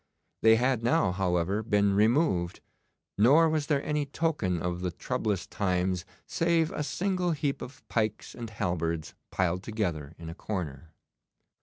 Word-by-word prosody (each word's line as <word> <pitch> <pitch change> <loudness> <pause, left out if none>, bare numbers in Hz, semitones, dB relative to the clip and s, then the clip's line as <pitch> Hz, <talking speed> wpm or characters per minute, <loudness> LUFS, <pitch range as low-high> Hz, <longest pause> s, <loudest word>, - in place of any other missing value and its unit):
They 110 0 +7
had 125 0 +1
now, 115 -5 +2
however, 90 +2 0
been 105 -2 +2
removed, 105 - +2 0.6
nor 145 +10 +6
was 155 -2 0
there 145 -3 +1
any 150 -1 0
token 140 - 0
of 90 +1 -2
the 90 - -1
troublous 105 -1 -2
times 90 -2 -1 0.2
save 165 -1 +1
a - - -3
single 180 +2 0
heap 145 -2 -2
of 130 - -10
pikes 110 -2 -1
and 115 -2 -6
halberds 85 -6 -2 0.2
piled 90 -1 0
together 85 -9 -3
in 80 - -9
a 80 - -5
corner. 85 -6 -5
105 Hz, 145 wpm, -29 LUFS, 90-140 Hz, 0.6 s, They